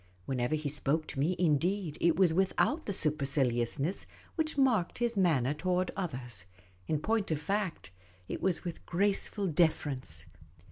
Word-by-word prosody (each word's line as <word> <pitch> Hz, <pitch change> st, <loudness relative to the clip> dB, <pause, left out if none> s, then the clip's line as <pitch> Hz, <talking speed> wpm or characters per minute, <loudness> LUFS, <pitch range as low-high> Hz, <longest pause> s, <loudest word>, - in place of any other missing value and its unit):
Whenever 125 Hz, +1 st, 0 dB
he 155 Hz, -1 st, -3 dB
spoke 150 Hz, +2 st, 0 dB
to 135 Hz, -, -5 dB
me, 165 Hz, +6 st, +2 dB
indeed, 170 Hz, +1 st, +1 dB
it 170 Hz, -1 st, +4 dB
was 185 Hz, -4 st, +4 dB
without 195 Hz, -, +1 dB
the -, -, 0 dB
super 155 Hz, -6 st, 0 dB
ciliousness 135 Hz, +4 st, 0 dB, 0.3 s
which 315 Hz, -2 st, -2 dB
marked 240 Hz, -10 st, +2 dB
his 235 Hz, -1 st, 0 dB
manner 150 Hz, -9 st, +2 dB
toward 180 Hz, +4 st, 0 dB
others; 125 Hz, -, -5 dB, 0.4 s
in 155 Hz, -, +1 dB
point 220 Hz, +5 st, 0 dB
of 155 Hz, -2 st, 0 dB
fact, 195 Hz, -, -2 dB, 0.4 s
it -, -, -5 dB
was 185 Hz, -1 st, +1 dB
with 175 Hz, -3 st, -6 dB
graceful 200 Hz, +2 st, +1 dB
deference. 145 Hz, -, 0 dB
165 Hz, 150 wpm, -31 LUFS, 140-195 Hz, 0.4 s, it